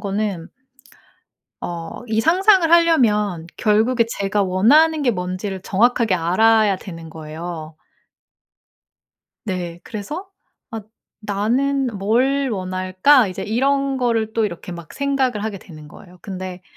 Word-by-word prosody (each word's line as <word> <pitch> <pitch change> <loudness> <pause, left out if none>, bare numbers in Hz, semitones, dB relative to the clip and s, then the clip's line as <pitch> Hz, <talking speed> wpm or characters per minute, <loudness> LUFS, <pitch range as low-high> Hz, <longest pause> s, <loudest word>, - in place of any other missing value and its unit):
거는 200 -4 -3 1.1
어 170 -2 -6
이 220 0 0
상상을 370 - +4
하려면 215 - +3
결국에 225 +3 +2
제가 200 -2 -1
원하는 280 +13 +4
게 255 - +3
뭔 180 -3 -4
지를 190 -1 -5
정확하게 230 +1 +2
알아야 205 +4 +3
되는 165 -3 -10
거예요. 160 0 -8 1.7
네. 175 -4 -4
그래서 295 - -6 0.4
'아 225 -1 -5 0.4
나는 245 +7 0
뭘 255 +8 +1
원할까?' 185 +6 +2
이제 185 - -6
이런 275 +4 0
거를 230 -4 0
또 225 0 +1
이렇게 180 -2 -5
막 170 -2 -10
생각을 265 -6 -1
하게 215 -3 -4
되는 155 -5 -13
거예요. 180 +3 -15
근데 185 -2 -7
210 Hz, 245 characters per minute, -20 LUFS, 185-255 Hz, 1.7 s, 상상을